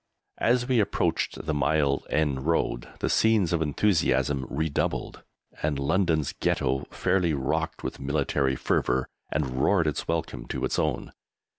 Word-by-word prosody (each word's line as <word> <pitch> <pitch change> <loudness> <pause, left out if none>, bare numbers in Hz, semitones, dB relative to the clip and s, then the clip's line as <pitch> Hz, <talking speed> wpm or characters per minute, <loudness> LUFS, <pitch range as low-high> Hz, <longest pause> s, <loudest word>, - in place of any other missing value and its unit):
As 120 +1 +2
we 130 -3 +3
approached 100 -1 0
the 80 - -1
Mile 70 -1 +1
End 75 -2 0
Road 80 -7 0
the - - +1
scenes 110 -6 +3
of 85 - +1
enthusiasm 75 -5 +1
redoubled, 75 +1 -2 0.4
and 75 -2 0
London's 80 +1 +1
Ghetto 65 0 0
fairly 85 -5 +1
rocked 65 -2 -2
with - - -4
military 70 -1 0
fervour 65 0 0 0.2
and 65 -4 -1
roared 95 -2 +3
its 75 - -2
welcome 80 -7 -3
to - - -2
its - - -1
own. - - -1
75 Hz, 140 wpm, -27 LUFS, 70-85 Hz, 0.4 s, we